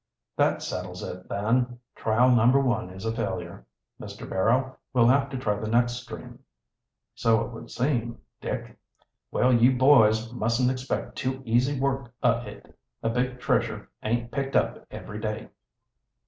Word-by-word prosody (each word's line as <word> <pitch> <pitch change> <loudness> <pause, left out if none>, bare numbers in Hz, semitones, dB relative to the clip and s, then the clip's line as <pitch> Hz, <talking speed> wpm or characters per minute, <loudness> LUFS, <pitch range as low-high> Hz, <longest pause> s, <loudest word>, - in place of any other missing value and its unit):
"That - - +2
settles 90 0 -5
it, 90 0 -7
then. 120 +5 0 0.2
Trial 120 +3 +3
No. 120 +3 +5
1 120 -8 0
is 95 +3 -9
a 110 - 0
failure. - - -4 0.3
Mr. - - -8
Barrow, 125 +7 +1 0.2
we'll 120 -2 +5
have 135 +3 +4
to 130 - -4
try 105 -5 -1
the 110 - -4
next 120 +1 +3
stream." 120 0 -9 0.7
"So 115 -2 +2
it 125 - -9
would 115 0 -10
seem, 120 -3 -1 0.2
Dick. - - -5 0.5
Well, 125 +1 +3
you 120 +2 +5
boys 115 -4 +5
mustn't 120 +2 +1
expect 130 0 -4
too 130 0 -2
easy 125 +4 +2
work 135 -3 -1
o' - - +4
it. 105 - -12 0.3
A 115 - +1
big 125 +1 -1
treasure 125 - -1
aint 120 +1 -1
picked 135 -1 -3
up - - 0
every 105 +1 -7
day." 110 0 -4
120 Hz, 155 wpm, -26 LUFS, 110-130 Hz, 0.7 s, No